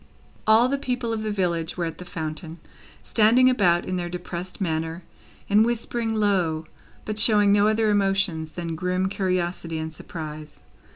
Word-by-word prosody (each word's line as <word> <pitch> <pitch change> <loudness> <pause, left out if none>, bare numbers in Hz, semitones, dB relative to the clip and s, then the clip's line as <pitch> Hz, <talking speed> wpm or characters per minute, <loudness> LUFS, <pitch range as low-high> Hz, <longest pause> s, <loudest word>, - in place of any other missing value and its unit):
All 220 +3 +6
the 275 +1 -1
people 250 -4 -2
of 220 - -2
the 215 - -2
village 175 -5 -1
were 175 - -1
at 165 - -6
the 180 - -8
fountain, 160 -1 -5 0.5
standing 240 +4 +4
about 175 -8 +2
in 185 - -2
their 175 -1 -3
depressed 180 +1 -6
manner, 165 -1 -2 0.4
and 210 +2 +5
whispering 235 0 -1
low, 180 -7 +1 0.4
but 215 0 -2
showing 210 -2 +4
no 205 +1 +4
other 220 0 +2
emotions 195 -6 +1
than 170 -2 -4
grim 180 +2 -1
curiosity 180 -4 -2
and 160 0 -4
surprise. 155 -2 -8
185 Hz, 160 wpm, -24 LUFS, 165-215 Hz, 0.5 s, All